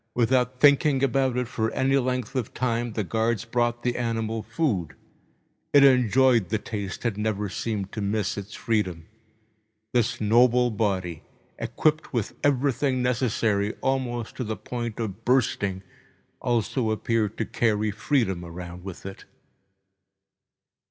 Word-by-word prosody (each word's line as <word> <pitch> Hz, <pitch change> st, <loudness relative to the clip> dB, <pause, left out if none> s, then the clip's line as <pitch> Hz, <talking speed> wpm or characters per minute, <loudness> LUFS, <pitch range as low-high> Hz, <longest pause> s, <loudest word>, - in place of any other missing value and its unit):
Without 125 Hz, +1 st, +2 dB
thinking 140 Hz, -1 st, +5 dB
about 135 Hz, -1 st, +2 dB
it 125 Hz, -1 st, 0 dB
for 110 Hz, -1 st, -1 dB
any 135 Hz, +1 st, +2 dB
length 125 Hz, -1 st, -1 dB
of 125 Hz, -5 st, -3 dB
time, 120 Hz, -2 st, -1 dB
the 110 Hz, -, -1 dB
guards 115 Hz, +2 st, 0 dB
brought 120 Hz, 0 st, 0 dB
the 125 Hz, -1 st, 0 dB
animal 115 Hz, -2 st, -2 dB
food. 105 Hz, -, -1 dB, 0.8 s
It 145 Hz, -1 st, +8 dB
enjoyed 125 Hz, -4 st, +4 dB
the 110 Hz, -, +1 dB
taste 105 Hz, 0 st, -5 dB
and 110 Hz, -4 st, 0 dB
never 105 Hz, -1 st, -1 dB
seemed 100 Hz, 0 st, -3 dB
to 110 Hz, -, -4 dB
miss 105 Hz, 0 st, -1 dB
its 100 Hz, +1 st, -7 dB
freedom. 95 Hz, -8 st, -1 dB, 0.9 s
This 120 Hz, -3 st, +1 dB
noble 120 Hz, +3 st, +4 dB
body, 95 Hz, -6 st, -1 dB, 0.4 s
equipped 155 Hz, -1 st, 0 dB
with 115 Hz, -5 st, -1 dB
everything 135 Hz, -1 st, +1 dB
necessary, 110 Hz, -4 st, +1 dB
almost 125 Hz, -3 st, -1 dB
to 130 Hz, -, -2 dB
the 110 Hz, -2 st, -4 dB
point 120 Hz, +2 st, -5 dB
of 110 Hz, -1 st, -4 dB
bursting, 105 Hz, -6 st, +1 dB, 0.6 s
also 120 Hz, 0 st, 0 dB
appeared 110 Hz, -1 st, 0 dB
to -, -, -1 dB
carry 110 Hz, -2 st, +1 dB
freedom 105 Hz, -4 st, 0 dB
around 85 Hz, +1 st, -8 dB
with 95 Hz, -2 st, -8 dB
it. 95 Hz, 0 st, -8 dB
115 Hz, 135 wpm, -25 LUFS, 105-125 Hz, 0.9 s, It